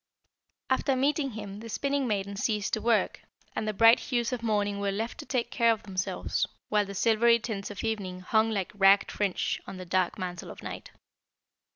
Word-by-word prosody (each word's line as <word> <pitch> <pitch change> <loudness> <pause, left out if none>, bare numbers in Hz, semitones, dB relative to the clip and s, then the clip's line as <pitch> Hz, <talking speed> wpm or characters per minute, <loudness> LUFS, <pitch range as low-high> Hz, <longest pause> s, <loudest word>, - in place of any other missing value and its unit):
"After 260 +1 +2
meeting 275 0 +1
him 205 -2 -7
the 230 +1 -9
Spinning 275 +4 0
maiden 200 -2 -2
ceased 210 0 -1
to 220 - 0
work, 230 -2 +2 0.4
and 215 - -2
the - - +1
bright 225 +3 +7
hues 240 -1 -1
of 245 - -3
morning 205 -3 0
were 200 0 0
left 225 +4 -4
to - - -8
take 250 -3 -1
care 235 -2 +4
of 220 - -2
themselves, 190 -1 -2 0.2
while 210 -1 +2
the 200 - -7
silvery 230 +3 +4
tints 215 -4 -5
of 205 - -6
evening 200 -5 -3
hung 220 +4 +2
like 200 -4 -2
ragged 200 0 +5
fringe 200 -3 -1
on 190 - -7
the 185 - -7
dark 185 0 0
mantle 180 -2 -5
of - - -10
night. - - -7
215 Hz, 195 wpm, -28 LUFS, 195-230 Hz, 0.4 s, bright